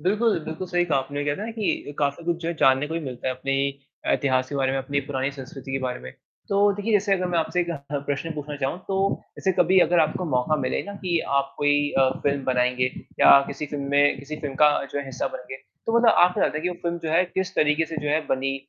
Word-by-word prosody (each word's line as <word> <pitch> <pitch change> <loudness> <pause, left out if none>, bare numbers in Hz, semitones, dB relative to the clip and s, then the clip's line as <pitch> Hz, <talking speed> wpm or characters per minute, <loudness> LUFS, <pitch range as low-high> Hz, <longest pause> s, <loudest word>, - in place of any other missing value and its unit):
बिल्कुल, 210 +3 +2
बिल्कुल, 160 +4 -5
सही 175 -1 +1
कहा 150 -5 +1
आपने 140 +2 -4
वो - - -2
कहते 145 +5 -1
है 215 - -3
ना, 230 - -5
कि 215 -9 -2
काफ़ी 145 +2 -1
कुछ 170 0 0
जो 165 - -2
है 170 - -2
जानने 135 +2 +4
को 160 - -4
भी 165 - -1
मिलता 130 -4 -5
है 130 - -1
अपने 135 +2 -2 0.5
अ, - - +3
इतिहास 130 -2 +1
के - - -6
बारे 135 -1 +1
में, 135 - 0
अपनी 140 +2 -1
पुरानी 135 -1 -2
संस्कृति 135 0 -9
के 135 - 0
बारे 130 -1 -3
में। 65 - -9 0.4
तो 200 +1 +3
देखिए 205 +2 -2
जैसे 205 -1 +3
अगर 185 -1 -1
मैं 170 - +2
आपसे 170 +2 0
एक 175 0 -2
अ, 170 - -2 0.3
प्रश्न 145 +3 -2
पूछना 150 0 -5
चाहूँ 135 +6 -1
तो, 195 0 0 0.2
ऐसे 190 - +1
कभी 180 +2 +5
अगर 175 -1 +4
आपको 160 +3 0
मौका 130 +4 +1
मिले 130 - -1
ना 200 - -7
कि 175 -2 +1 0.2
आप 140 0 -9
कोई 145 0 +2
अ, 135 -1 +5
फ़िल्म 140 -1 0
बनाएँगे 125 0 +1 0.3
या - - +9
किसी 150 - -5
फ़िल्म 145 -1 -5
में 145 0 +3
किसी 150 +2 -7
फ़िल्म 140 -2 -4
का 150 - +7
जो 140 - -5
है 140 - -3
हिस्सा 135 - -3
बनेंगे 125 +1 -9 0.3
तो 230 - +2
मतलब 235 -1 +5
आप 180 +1 +5
क्या - - 0
चाहते 155 - +1
है - - -6
कि 180 - 0
वो 180 - -4
फ़िल्म 170 0 -2
जो 160 - -1
है 170 +3 +4
किस 185 +1 -3
तरीके 150 +1 +2
से 160 - -7
जो 150 - -2
है 150 +2 +2
बनी 135 +1 0
145 Hz, 270 wpm, -24 LUFS, 135-175 Hz, 0.5 s, या